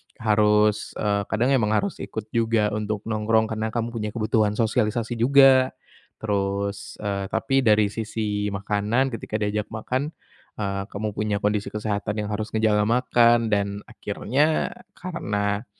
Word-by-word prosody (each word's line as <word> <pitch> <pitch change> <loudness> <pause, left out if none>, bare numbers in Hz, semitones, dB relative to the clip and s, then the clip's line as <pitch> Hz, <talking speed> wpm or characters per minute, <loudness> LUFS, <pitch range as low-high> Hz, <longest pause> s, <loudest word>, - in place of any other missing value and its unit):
harus, 105 -1 +2
eee, 100 -1 -1
kadang 120 +5 +1
emang 110 -5 +2
harus 200 - -1
ikut 110 0 -6
juga 115 -2 +1
untuk 105 -1 -3
nongkrong, 110 0 +1
karena 110 0 -2
kamu 115 0 -2
punya 105 -2 -2
kebutuhan 110 -2 +1
sosialisasi 115 +1 0
juga. 130 +1 +5 0.5
Terus, 100 -1 -2
eee, 100 -1 -2
tapi 135 +6 +1
dari 105 -5 +3
sisi 105 -2 -2
makanan, 105 +6 0
ketika 115 -2 -5
diajak 105 -1 -1
makan, 130 +7 -3 0.4
eee, 100 -2 -2
kamu 110 0 -4
punya 105 0 -1
kondisi 105 0 0
kesehatan 105 -1 -3
yang 105 - -5
harus 105 +1 -2
ngejaga 105 -1 +2
makan, 120 -1 +3
dan 100 0 0
akhirnya 140 +9 0 0.2
karena, 105 - -2
110 Hz, 135 wpm, -24 LUFS, 105-115 Hz, 0.5 s, juga